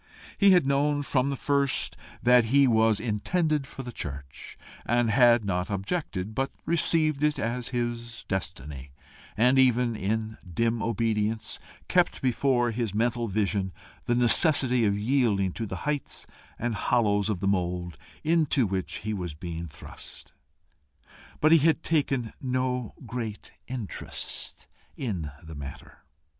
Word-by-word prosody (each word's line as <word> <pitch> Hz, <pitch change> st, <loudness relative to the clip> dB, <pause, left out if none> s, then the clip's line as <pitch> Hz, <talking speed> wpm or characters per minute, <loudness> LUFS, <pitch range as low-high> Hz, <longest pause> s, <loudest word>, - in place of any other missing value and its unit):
He 200 Hz, -, +5 dB
had 180 Hz, -6 st, +6 dB
known 145 Hz, +1 st, +1 dB
from 135 Hz, -1 st, +1 dB
the 140 Hz, -, -1 dB
first 140 Hz, 0 st, 0 dB, 0.3 s
that 125 Hz, -1 st, +6 dB
he 140 Hz, +5 st, +5 dB
was 110 Hz, -3 st, +3 dB
intended 140 Hz, -, 0 dB
for 135 Hz, -, -8 dB
the 120 Hz, -, -6 dB
church, 70 Hz, -, -7 dB, 0.3 s
and 120 Hz, -1 st, +2 dB
had 120 Hz, 0 st, +5 dB
not 90 Hz, 0 st, -1 dB
objected, 100 Hz, -, -3 dB
but 135 Hz, +4 st, -1 dB, 0.2 s
received 155 Hz, -3 st, +1 dB
it 150 Hz, 0 st, +2 dB
as 120 Hz, 0 st, -2 dB
his 120 Hz, -1 st, -4 dB
destiny 70 Hz, -7 st, -5 dB, 0.4 s
had 125 Hz, +4 st, +4 dB
even, 125 Hz, -2 st, +3 dB
in 110 Hz, +2 st, -2 dB
dim 115 Hz, +5 st, 0 dB
obedience, 110 Hz, -1 st, -1 dB, 0.3 s
kept -, -, +2 dB
before 125 Hz, -1 st, +2 dB
his 115 Hz, -3 st, -2 dB
mental 120 Hz, +1 st, +1 dB
vision 100 Hz, -2 st, -1 dB, 0.3 s
the 120 Hz, -, +1 dB
necessity 125 Hz, -, +4 dB
of 100 Hz, -1 st, +2 dB
yielding 105 Hz, -5 st, +2 dB
to 115 Hz, -, -4 dB
the -, -, -5 dB
heights 150 Hz, -1 st, -2 dB, 0.3 s
and 120 Hz, 0 st, -2 dB
hollows 105 Hz, -1 st, +1 dB
of 100 Hz, -4 st, -1 dB
the 100 Hz, -, -1 dB
mould 90 Hz, -3 st, -1 dB, 0.3 s
into 155 Hz, -5 st, +3 dB
which 95 Hz, -2 st, -2 dB
he 110 Hz, -, -1 dB
was 90 Hz, -6 st, -4 dB
being 85 Hz, +1 st, -6 dB
thrust. 75 Hz, -, -11 dB, 1.1 s
But 155 Hz, +1 st, +4 dB
he 165 Hz, -, +8 dB
had 160 Hz, +2 st, +2 dB
taken 135 Hz, -7 st, 0 dB
no 125 Hz, -2 st, -1 dB
great 115 Hz, -2 st, -5 dB, 0.2 s
interest 125 Hz, -6 st, -6 dB, 0.3 s
in 95 Hz, -, -3 dB
the 80 Hz, 0 st, -9 dB
matter. 70 Hz, -2 st, -9 dB
115 Hz, 140 wpm, -27 LUFS, 100-135 Hz, 1.1 s, he